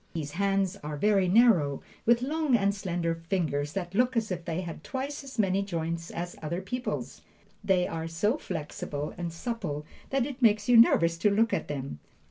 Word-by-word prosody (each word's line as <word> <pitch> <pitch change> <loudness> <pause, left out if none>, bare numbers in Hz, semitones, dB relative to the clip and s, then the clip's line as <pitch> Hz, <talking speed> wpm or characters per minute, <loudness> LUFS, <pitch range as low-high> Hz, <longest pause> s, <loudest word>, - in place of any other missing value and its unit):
His 150 -3 -3
hands 195 +2 0
are 150 -5 -6
very 195 +2 +3
narrow, 180 - +4 0.2
with 235 +1 +4
long 300 -1 +1
and 200 -2 +2
slender 175 -4 -2
fingers 150 -6 0
that 180 -2 -4
look 250 +3 +2
as 220 -3 0
if 175 -2 -4
they 170 +1 -2
had 170 -3 -7
twice 280 +2 -4
as 270 -2 -10
many 195 -2 +2
joints 170 -3 -3
as 175 +1 -5
other 165 +3 -2
people's. 250 +7 -4 0.4
They 190 -3 +2
are 165 0 -4
so 205 - 0
flexible 150 - -5
and 170 -1 -4
supple 165 -5 -4 0.2
that 270 -2 +1
it 270 -1 -7
makes 210 -3 +4
you 245 - +5
nervous 170 -7 +6
to 210 - +4
look 225 +3 +2
at - - -1
them. 135 - -5
190 Hz, 185 wpm, -28 LUFS, 165-230 Hz, 0.4 s, nervous